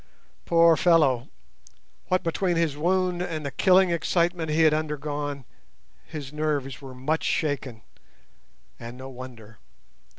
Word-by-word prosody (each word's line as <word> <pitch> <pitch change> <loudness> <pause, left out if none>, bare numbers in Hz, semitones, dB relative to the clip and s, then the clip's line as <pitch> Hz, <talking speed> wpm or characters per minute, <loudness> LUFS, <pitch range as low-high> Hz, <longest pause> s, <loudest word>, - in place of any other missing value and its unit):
Poor 170 -1 +5
fellow, 150 -9 +3 0.8
what 185 0 +1
between 175 +2 0
his 165 -4 +1
wound 180 +3 0
and 165 -4 -4
the 140 - -3
killing 185 +2 +4
excitement 170 0 0
he 155 +2 +3
had 155 -1 +5
undergone 145 -2 -3 0.6
his 150 -3 -7
nerves 145 -4 -2
were 135 -2 -10
much 150 +6 -1
shaken, 135 -7 -2 1.0
and 120 +1 -9
no 130 +1 -8
wonder! 120 -4 -11
150 Hz, 125 wpm, -25 LUFS, 135-170 Hz, 1.0 s, Poor